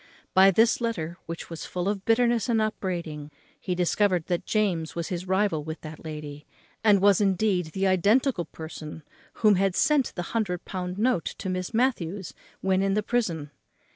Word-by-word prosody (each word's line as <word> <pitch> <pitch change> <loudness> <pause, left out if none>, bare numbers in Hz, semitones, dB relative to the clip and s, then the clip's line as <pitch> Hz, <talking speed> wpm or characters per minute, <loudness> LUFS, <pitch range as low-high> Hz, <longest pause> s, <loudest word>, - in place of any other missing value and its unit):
By 190 +1 +7
this 225 +5 +3
letter, 175 -8 -3
which 165 +1 -7
was 165 - -6
full 180 +1 -3
of 200 -1 -2
bitterness 235 +1 +2
and 230 -2 +3
upbraiding, 170 -8 -3 0.3
he 180 - -2
discovered 180 0 +1
that 175 -2 -2
James 185 -7 0
was 170 -1 -3
his 180 0 -4
rival 190 -5 +1
with 160 +1 -6
that 155 -1 -9
lady, 150 -2 -7 0.4
and 210 -3 +5
was, 200 -1 +5
indeed, 195 -2 +1
the 190 +5 -2
identical 200 +3 +2
person 155 0 -9 0.4
who 210 - +8
had 195 -1 +1
sent 295 -4 +2
the 175 - -3
hundred 200 -6 -1
pound 180 -1 -4
note 220 -6 +1
to 190 - -4
Miss 185 0 -3
Matthews, 205 -7 -1 0.3
when 190 0 +2
in 195 0 +1
the 210 - +1
prison. 175 -11 -1
185 Hz, 170 wpm, -26 LUFS, 165-210 Hz, 0.4 s, who